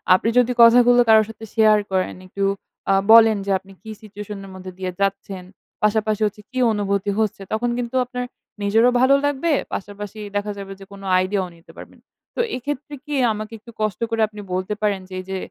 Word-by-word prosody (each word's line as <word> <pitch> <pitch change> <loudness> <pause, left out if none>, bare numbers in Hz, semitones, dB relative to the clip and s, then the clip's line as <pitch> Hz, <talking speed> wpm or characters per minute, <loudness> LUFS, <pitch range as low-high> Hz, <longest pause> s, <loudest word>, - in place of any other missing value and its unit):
আপনি 215 - 0
যদি 250 0 +4
কথাগুলো 245 +1 +7
কারো 220 0 +7
সাথে 225 0 -9
শেয়ার 215 -1 +5
করেন, 185 -1 0
একটু 200 +2 -4 0.5
আ - - +5 0.2
বলেন 225 -2 +8
যে 200 - -1
আপনি 195 - -18
কি 220 - -8
situation 210 -1 -8
এর - - -11
মধ্যে 185 0 -8
দিয়ে 185 -1 -3
যাচ্ছেন? 195 -1 -2 0.4
পাশাপাশি 215 0 +1
হচ্ছে 210 0 -4
কি 255 - -3
অনুভূতি 200 -1 -1
হচ্ছে? 215 -2 -1
তখন 240 +2 0
কিন্তু 245 +1 -4
আপনার 250 0 -5 0.4
নিজেরও 225 +5 +4
ভালো 260 +2 +5
লাগবে, 290 +3 0 0.2
পাশাপাশি 205 +1 -6 0.2
দেখা 205 +1 -1
যাবে 195 -1 -8
যে 195 - -11
কোনো 195 0 -11
আইডিয়াও 185 0 -1
নিতে 165 - -18
পারবেন। - - -12 0.4
তো - - -6 0.2
এইক্ষেত্রে 290 +3 -5
কি 295 - -3 0.2
আমাকে 215 +1 -7
একটু 235 - -14
কষ্ট 215 -4 -1
করে 225 -1 -1
আপনি 210 -1 -10
বলতে 185 +3 -2
পারেন 205 -2 +1
যে - - -11
এইযে 190 +1 -5
210 Hz, 190 wpm, -21 LUFS, 195-230 Hz, 0.5 s, বলেন